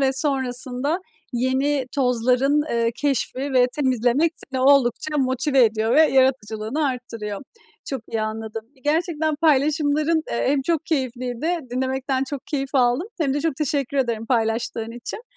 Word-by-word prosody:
ve 270 -1 +3
sonrasında 265 +2 -1 0.3
yeni 260 +2 0
tozların, 255 +2 +2
eee, 230 0 +1
keşfi 270 -2 -1
ve 250 -1 +5
temizlemek 260 +3 +2 0.2
seni 260 -1 -2
oldukça 280 +2 +3
motive 260 0 +3
ediyor 220 +1 +1
ve 310 - +7
yaratıcılığını 260 -1 +1
arttırıyor. 230 -5 -5 0.4
Çok 265 -4 -4
iyi 225 -1 -2
anladım. 220 0 -4
Ve - - -24
gerçekten 315 0 0
paylaşımların, 305 +1 +2
eee, 235 - 0
hem 275 -1 +1
çok 325 +1 -1
keyifliydi. 260 +3 -1
Dinlemekten 265 +1 -1
çok 275 0 -6
keyif 275 -1 -3
aldım. 250 - +2
Hem 275 -3 +1
de 290 - 0
çok 315 -3 -1
teşekkür 280 -2 -1
ederim 230 -4 0
paylaştığın 225 -1 -1
için. 335 - -6
265 Hz, 140 wpm, -23 LUFS, 245-290 Hz, 0.4 s, ve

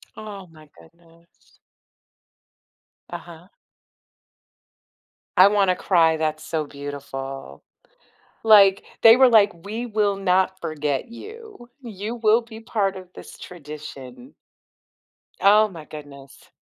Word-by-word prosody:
Oh, 205 -3 -9
my 155 -1 -17
goodness. 170 - -24 1.5
Uh-huh. 175 0 -10 1.9
I 185 +2 +7
wanna 200 -3 +2
cry, 165 -4 +2
that's 155 -1 -3
so 160 -2 -3
beautiful. 135 - -8 0.8
Like, 200 -3 +6 0.2
they 225 +1 +8
were 260 -1 +6
like, 210 -2 +5
"We 215 +8 -6
will 210 -3 0
not 190 0 0
forget 150 -3 -3
you. 425 - -12
You 220 -1 -7
will 225 +1 +3
be 225 -1 -12
part 205 -4 -1
of 185 -1 -11
this - - -12
tradition." 150 - -11 1.1
Oh, 210 +2 +5
my 165 -6 -11
goodness. 140 -3 -13
185 Hz, 105 wpm, -22 LUFS, 155-215 Hz, 1.9 s, they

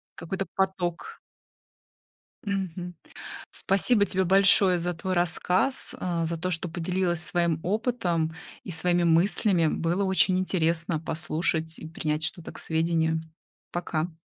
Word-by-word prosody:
Какой-то 190 +3 -4
поток. 190 - -2 1.2
Мгм. 180 -3 -4 0.5
Спасибо 200 +2 +2
тебе 190 -1 0
большое 190 0 +5
за 175 +1 -2
твой 185 +3 -3
рассказ, 180 +7 +1
а, 170 -2 -1
за 165 0 -2
то, 185 +2 -2
что 170 +1 -1
поделилась 175 0 -1
своим 170 -3 0
опытом 185 -6 0 0.3
и 185 - -6
своими 175 +1 +1
мыслями. 170 +1 +3
Было 170 +5 0
очень 190 -1 +3
интересно 170 -3 0
послушать 160 0 -1
и 160 - -8
принять 155 -1 -2
что-то 165 +1 -3
к - - -8
сведению. 160 0 +1 0.5
Пока. 170 -1 -2
175 Hz, 120 wpm, -26 LUFS, 165-190 Hz, 1.2 s, большое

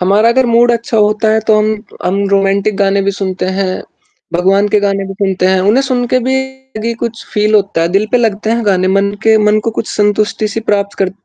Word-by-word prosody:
हमारा 200 +5 +3
अगर 255 +1 +2
मूड 235 +1 +3
अच्छा 235 -1 -2
होता 215 +1 +2
है 220 - +2
तो 215 - +5
हम 215 - +1 0.4
हम 185 +2 0
रोमांटिक 195 +1 +1
गाने 200 0 +1
भी 200 - 0
सुनते 190 -1 -3
हैं 190 -1 -2 0.5
भगवान 195 +4 +2
के 210 - +4
गाने 195 -1 -1
भी 195 - -7
सुनते 190 -2 0
हैं, 190 0 +2
उन्हें 215 +8 +2
सुन 250 -2 -1
के 255 - +4
भी 265 -3 -3
कुछ 230 -1 -4
फील 210 +1 +1
होता 200 -4 +1
है 165 - +1
दिल 215 - -2
पे - - +5
लगते 220 -2 -1
हैं 230 0 0
गाने 185 -2 +2
मन 200 0 +1
के 220 0 +4
मन 210 0 +3
को 230 - 0
कुछ - - -7
संतुष्टि 210 +1 0
सी 225 - -2
प्राप्त 200 0 -1
कर 190 -1 0
210 Hz, 225 wpm, -13 LUFS, 195-225 Hz, 0.5 s, तो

